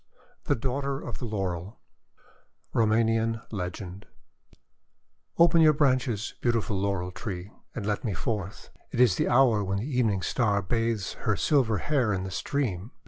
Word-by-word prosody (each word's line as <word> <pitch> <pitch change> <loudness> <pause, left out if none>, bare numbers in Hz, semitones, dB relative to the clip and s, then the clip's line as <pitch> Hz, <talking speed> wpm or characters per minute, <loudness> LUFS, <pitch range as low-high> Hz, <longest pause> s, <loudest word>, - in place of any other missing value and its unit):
THE - - +2
DAUGHTER 135 +3 -2
OF 120 - -6
THE - - -4
LAUREL 95 -2 -3 1.0
Roumanian 115 0 +2
Legend 95 -1 -6 1.3
"OPEN 170 0 +6
your 155 -1 +7
branches, 130 -7 +1
beautiful 115 -3 0
Laurel 95 -2 -1
Tree, 90 0 -6 0.2
and 110 - -4
let 105 -1 -1
me 105 -7 -2
forth. 100 +1 -4 0.2
It - - -4
is 120 -7 +5
the - - +1
hour 120 -4 +4
when 95 0 -1
the 105 - -3
Even 125 -6 +1
ing 95 - -2
Star 100 0 +1
bathes 115 -1 -1
her - - +3
silver 125 -8 +2
hair 125 -2 +1
in 95 -1 -2
the 95 - -5
stream." 110 -6 -2
110 Hz, 150 wpm, -27 LUFS, 100-125 Hz, 1.3 s, your